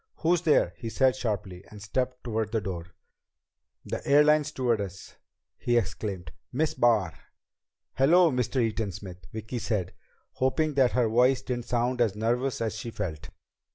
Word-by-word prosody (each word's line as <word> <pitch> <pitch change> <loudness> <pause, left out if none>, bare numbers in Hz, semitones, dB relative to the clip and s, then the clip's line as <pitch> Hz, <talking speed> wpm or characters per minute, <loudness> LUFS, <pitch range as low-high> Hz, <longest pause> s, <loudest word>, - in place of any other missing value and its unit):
"Who's 170 +1 +1
there?" 150 - +3
he 115 - -5
said 130 +2 +3
sharply, 100 -7 -4
and 105 - -11
stepped 125 +5 -2
toward 110 -2 -2
the 115 - +1
door. 90 -4 -6 0.9
"The - - -4
airline 150 +2 +5
stewardess!" 115 - -3 0.4
he 120 0 +1
exclaimed. 95 -4 -3 0.2
"Miss 150 +5 0
Barr!" 110 -9 +2 0.8
"Hello, 165 +5 +5
Mr. 125 +1 0
Eaton 110 -3 0
Smith," 90 -2 -10
Vicki 110 +3 -5
said, 100 -6 -2 0.4
hoping 150 +4 0
that 135 -3 +3
her 125 -2 +3
voice 125 +3 +3
didn't 120 -2 -3
sound 120 +1 0
as 110 -4 +2
nervous 120 +5 -1
as 110 -1 -1
she 120 - -5
felt. 80 -8 -5
120 Hz, 150 wpm, -27 LUFS, 100-130 Hz, 0.9 s, airline